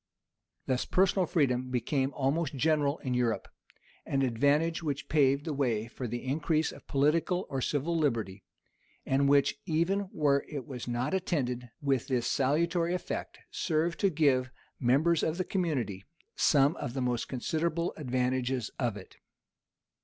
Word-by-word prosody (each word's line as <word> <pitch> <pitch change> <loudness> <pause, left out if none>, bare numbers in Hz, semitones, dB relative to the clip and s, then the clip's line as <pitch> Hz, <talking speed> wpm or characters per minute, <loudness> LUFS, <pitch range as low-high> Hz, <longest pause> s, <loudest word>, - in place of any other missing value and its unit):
Thus 130 -1 0
personal 190 -1 +2
freedom 130 -6 +1
became 130 +2 0
almost 145 +2 0
general 145 +1 +2
in 130 - -1
Europe; 120 -2 0 0.6
an 135 0 0
advantage 145 +7 +2
which 145 -3 -3
paved 140 -1 +3
the 160 - -2
way 120 -6 0
for 125 +1 -6
the 120 +3 -5
increase 155 +3 0
of - - -14
political 165 +6 +1
or 135 -1 -1
civil 150 +6 -1
liberty, 115 - -1 0.6
and 140 +1 +2
which, 140 0 +3
even 185 +5 0
where 140 -2 +2
it 140 -5 -5
was 125 -2 -7
not 120 +6 -1
attended 125 -10 -1
with 135 -4 +1
this 125 -3 0
salutary 165 +5 +1
effect, 180 - -5
served 165 0 0
to 200 - +3
give 145 -6 +3 0.3
the - - -6
members 155 +6 +4
of 160 +1 -1
the 185 - -1
community 135 - -2 0.3
some 145 +1 +4
of 120 - -5
the 135 - -1
most 125 -2 -1
considerable 165 +6 -1
advantages 125 -3 -1
of 120 -5 0
it. 95 - -13
140 Hz, 150 wpm, -30 LUFS, 125-160 Hz, 0.6 s, members